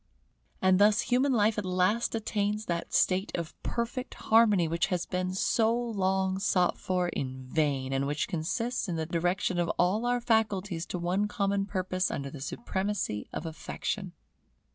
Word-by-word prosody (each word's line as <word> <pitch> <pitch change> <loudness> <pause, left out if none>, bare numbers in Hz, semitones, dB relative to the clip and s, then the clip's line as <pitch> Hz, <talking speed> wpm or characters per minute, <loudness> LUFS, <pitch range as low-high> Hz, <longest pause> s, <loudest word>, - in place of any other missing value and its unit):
And 185 0 +5
thus 205 +1 +5
human 260 +3 +2
life 215 -2 +3
at - - -3
last 185 +6 +1
attains 210 -1 -1
that 170 -1 -3
state 190 +2 +2
of 170 -2 -4
perfect 235 +2 -3
harmony 215 -6 +4
which 165 +3 0
has 180 -3 -1
been 185 0 -2
so 220 +3 +2
long 190 -5 0
sought 180 -3 +2
for 180 -1 0
in 130 -4 -4
vain, 135 -3 0
and 135 +1 0
which 145 +1 -1
consists 220 +8 -2
in 170 - -1
the 160 -1 -2
direction 175 +2 0
of 175 - +1
all 205 +7 +2
our 245 0 +2
faculties 205 -7 0
to - - -3
one 180 +4 0
common 200 -1 0
purpose 185 -1 -1
under 140 -1 -4
the 140 - -9
supremacy 190 - -3
of - - -5
Affection. 175 +4 -4
190 Hz, 165 wpm, -29 LUFS, 170-210 Hz, -, And